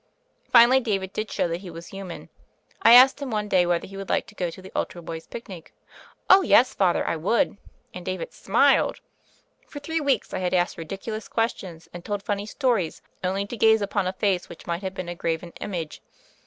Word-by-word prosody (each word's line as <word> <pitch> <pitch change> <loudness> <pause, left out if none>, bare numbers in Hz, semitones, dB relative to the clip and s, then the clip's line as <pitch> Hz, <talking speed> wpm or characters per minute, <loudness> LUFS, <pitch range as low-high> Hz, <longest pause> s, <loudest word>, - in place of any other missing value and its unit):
Finally, 245 +2 +7
David 200 -6 -2
did 215 0 -3
show - - 0
that 170 +1 -4
he 190 - -9
was 165 0 -10
human. 195 -3 -8 0.5
I 230 - +7
asked 260 +4 +8
him 280 - -4
one 210 -2 -2
day 180 -3 +3
whether 175 -1 0
he 195 0 -10
would 195 -1 -7
like - - +1
to - - -15
go 180 -4 -2
to 165 - -11
the 190 0 -12
altar 175 - -3
boys' 165 -1 -8
picnic. 190 -8 -10 0.5
"Oh, 380 +1 +8
yes. 255 -8 +4
Father, 185 -3 +1
I - - -1
would." 200 +6 +1 0.4
And 180 - -8
David 185 -1 -5
smiled. 265 +7 +2 0.7
For - - -11
three 320 +3 -2
weeks 280 -2 0
I - - -2
had 185 0 0
asked 175 -1 0
ridiculous 195 +6 -6
questions, 190 -7 -3
and 175 -1 -8
told 205 0 -4
funny 205 0 -3
stories, 225 - -1 0.2
only 190 +2 -1
to 220 - -7
gaze 220 -1 +4
upon 200 -1 -1
a 185 - -2
face 190 -2 -1
which 170 - -12
might 170 +1 -3
have 190 -1 -5
been 185 -2 -5
a 175 - -4
graven 170 0 -3
image. 170 -6 -5
195 Hz, 210 wpm, -25 LUFS, 175-220 Hz, 0.7 s, asked